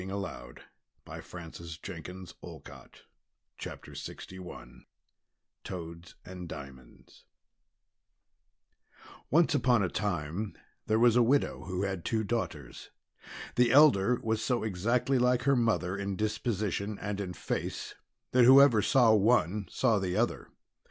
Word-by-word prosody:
Madame 95 -10 -6 0.5
Le - - -8
Prince 85 -1 -9
de 85 -2 -8 0.4
Beaumont - - -12 0.6
(After - - -8
Miss - - -7 0.2
Mulock) 95 -1 -9 1.0
TOADS 85 -1 -8
AND 90 -2 -8
DIAMONDS 65 -3 -12 2.0
Once 165 +2 +3
upon 125 -6 +3
a 90 - 0
time 95 +1 -3 0.3
there 110 - +2
was 120 0 +5
a 125 - +5
widow 135 +5 +1
who 95 0 -3
had 95 -3 -3
two 110 -1 -1
daughters. 90 - -4 0.7
The 120 -1 +4
elder 125 -5 +5
was 110 -1 -1
so 125 -2 0
exactly 115 +6 0
like 125 0 +2
her 140 +1 +3
mother 115 -6 +1
in 100 -1 -3
disposition 105 -1 -2
and 100 0 -4
in 90 -2 -5
face - - -4 0.4
that 125 -1 +5
whoever 130 -3 +7
saw 120 0 +4
one, 105 -2 +2
saw 115 -5 +2
the 90 -1 -2
other. - - -1
105 Hz, 125 wpm, -30 LUFS, 90-120 Hz, 2.0 s, whoever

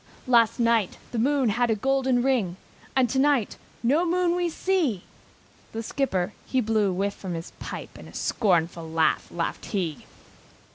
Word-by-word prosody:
"Last 235 -3 +4
night, 230 -4 +2
the 235 - -2
moon 270 0 +2
had 240 +3 +1
a 225 - +3
golden 260 +1 +1
ring, 225 -10 +1 0.4
And 260 -2 +4
tonight 270 -3 +2 0.3
no 285 +8 +3
moon 355 0 +2
we 350 -1 0
see!" 325 - 0 0.7
The 225 +1 -3
skipper, 210 -7 -1
he 260 - +1
blew 215 -3 +2
a - - -1
whiff 200 +2 -1
from 185 -4 -6
his 165 0 -6
pipe, - - -7
And - - -11
a - - -15
scornful 170 -5 0
laugh 160 -1 +1
laughed 170 -1 -3
he. 175 -8 -3
230 Hz, 160 wpm, -26 LUFS, 190-270 Hz, 0.7 s, Last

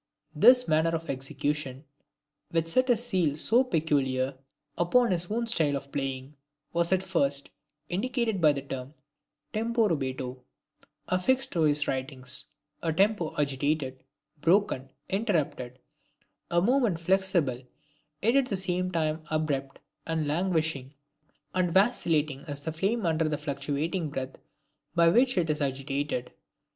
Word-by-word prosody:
This 250 0 +6
manner 160 +1 +3
of 165 0 -3
execution, 135 +1 -3 0.7
which 165 -1 +1
set 255 +11 +2
a 240 - +5
seal 185 -11 0
so 235 +10 +4
peculiar 140 - 0 0.4
upon 235 +7 +3
his 175 -1 0
own 235 +3 -1
style 160 -11 +2
of 140 0 -6
playing, 135 0 -4 0.4
was 170 +1 +1
at 190 0 +2
first 140 -7 +1 0.4
indicated 225 +1 -1
by 150 -2 +6
the 140 -1 -5
term 135 +1 -7 0.6
'tempo 225 0 +1
rubato', 130 -4 -3 0.6
affixed 260 +9 +1
to 170 - 0
his 145 -1 +1
writings: 130 -1 -3 0.4
a 165 - 0
Tempo 190 0 +1
agitated, 140 -1 -1 0.4
broken, 170 -7 +2 0.2
interrupted, 160 - -1 0.7
a 170 - +3
movement 235 -6 +2
flexible, 175 -8 +1 0.6
yet 230 +4 +3
at 275 -2 +4
the 200 - -1
same 185 0 0
time 160 -2 -1
abrupt 145 -4 -1 0.3
and 160 -2 -1
languishing, 155 -4 -1 0.6
and 185 -2 +1
vacillating 160 - +2
as 145 -1 -4
the 160 - -3
flame 195 +7 -1
under 160 -1 +1
the 150 - -1
fluctuating 150 +3 -2
breath 135 -2 -5 0.6
by 170 -1 +5
which 250 +5 +3
it 170 -2 +2
is 150 - -2
agitated. 135 -1 -2
160 Hz, 130 wpm, -28 LUFS, 140-190 Hz, 0.7 s, This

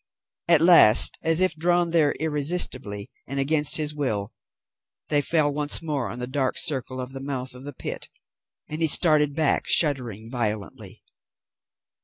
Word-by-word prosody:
At 170 -3 +4
last, 165 -11 +6
as 165 +2 0
if 185 -3 +2
drawn 175 +1 -1
there 155 -4 +1
irresistibly 140 - -1 0.2
and 140 +1 -5
against 150 +1 +4
his 150 -1 -3
will, 110 -9 -3 0.8
they 145 -1 +3
fell 145 0 0
once 145 0 -1
more 150 -6 -5
on 115 - -9
the 125 - -5
dark 130 +1 -3
circle 130 -3 -1
of 125 0 -7
the 135 - -8
mouth 130 -2 -6
of 125 +2 -13
the 145 - -8
pit, - - -8 0.6
and 155 +2 -7
he 160 - +2
started 150 -3 +3
back, 155 -3 0
shuddering 125 - 0
violently. 110 -4 -6
145 Hz, 155 wpm, -23 LUFS, 130-155 Hz, 0.8 s, last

